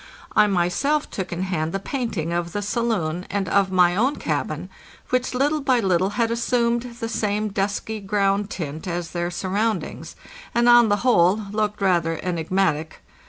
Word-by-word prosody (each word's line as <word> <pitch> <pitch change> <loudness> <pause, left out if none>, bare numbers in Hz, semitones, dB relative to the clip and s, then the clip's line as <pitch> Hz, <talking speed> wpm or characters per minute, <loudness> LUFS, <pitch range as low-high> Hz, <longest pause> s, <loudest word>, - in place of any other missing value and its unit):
I 210 - +6
myself 205 +11 0
took 190 -2 -4
in 175 +1 -2
hand 165 -4 -2
the 195 - -1
painting 205 - -3
of 170 0 -2
the 205 - -2
saloon 195 -7 -1
and 200 -1 -1
of 195 -1 +2
my 180 -1 +4
own 255 +8 +2
cabin, - - -3 0.4
which 255 0 0
little 290 +4 +1
by 260 -3 +2
little 190 -3 +2
had 230 -1 +2
assumed 235 0 0
the 230 - -2
same 215 -1 -1
dusky 205 +2 -2
eround 200 0 +1
tint 160 -1 -5
as 175 -1 -3
their 175 0 -2
surroundings, 200 +5 -2 0.4
and 240 0 +3
on 240 -2 +7
the 205 - +3
whole 185 -5 +5
looked 210 -1 -1
rather 170 -4 +1
enigmatic. 165 -2 -1
200 Hz, 165 wpm, -23 LUFS, 175-230 Hz, 0.4 s, on